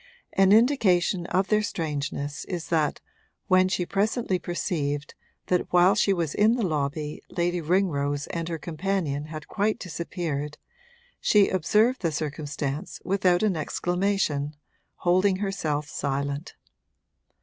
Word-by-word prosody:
An 195 0 +4
indication 200 - +3
of 190 +1 +1
their 215 0 +3
strangeness 145 -6 -3
is 175 -3 -5
that 155 -3 +1 0.4
when 185 0 +4
she 185 -1 -1
presently 200 0 0
perceived 145 -5 -2 0.3
that 180 -1 0
while 180 +2 +6
she 200 0 +2
was 170 -6 0
in 215 +3 +4
the 235 -4 0
lobby 150 -1 -2
Lady 175 0 -1
Ringrose 145 -5 0
and 170 0 -3
her 165 - -2
companion 160 -2 -2
had 155 -2 -8
quite 210 +1 0
disappeared, 160 -4 -4 0.6
she 205 -2 +4
observed 215 +8 +2
the 165 -4 0
circumstance 145 -1 -4
without 185 -1 +2
an 205 -4 +2
exclamation, 170 -2 -1 0.4
holding 185 +2 +3
herself 160 -7 -2
silent. 140 +1 -3
175 Hz, 125 wpm, -26 LUFS, 150-195 Hz, 0.6 s, while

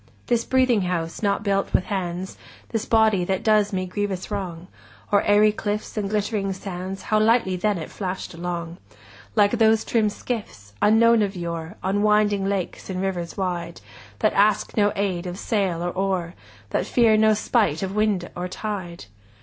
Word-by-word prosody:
This 235 -1 +1
breathing 255 -4 +3
house 170 -3 -2
not 200 -1 0
built 195 -1 0
with - - +3
hands, 185 -2 -4 0.3
This 225 -1 -2
body 220 -4 +3
that 190 0 -1
does 215 -1 +3
me 185 -1 -1
grievous 195 0 -3
wrong, 180 -4 -4 0.5
O'er 205 - +6
aery 210 +1 +4
cliffs 210 0 -4
and 205 -2 -2
glittering 205 -1 -1
sands, 190 0 -6
10 - - -11
How 215 - +3
lightly 215 -3 +3
then 205 +2 0
it 160 - -7
flash'd 185 -2 -5
along— 170 0 -5 0.6
Like 205 -1 +4
those 225 -2 +3
trim 220 -3 +2
skiffs, 205 - -6
unknown 230 +2 +5
of 200 -1 -1
yore, 170 +1 -5
On 195 +2 0
winding 210 -2 +3
lakes 195 -2 -3
and 185 -1 -3
rivers 185 -3 -3
wide, 175 -3 -3 0.4
That - - +2
ask 210 +1 +2
no 205 -1 +3
aid 190 -3 -1
of 180 +1 -5
sail 195 -6 -1
or 175 - -1
oar, 185 -3 -1 0.4
That - - 0
fear 230 -3 +4
no 215 0 +4
spite 205 -7 +1
of 190 0 -3
wind 210 -5 +1
or 180 +1 -3
tide! 185 - -5
195 Hz, 175 wpm, -23 LUFS, 180-215 Hz, 0.6 s, O'er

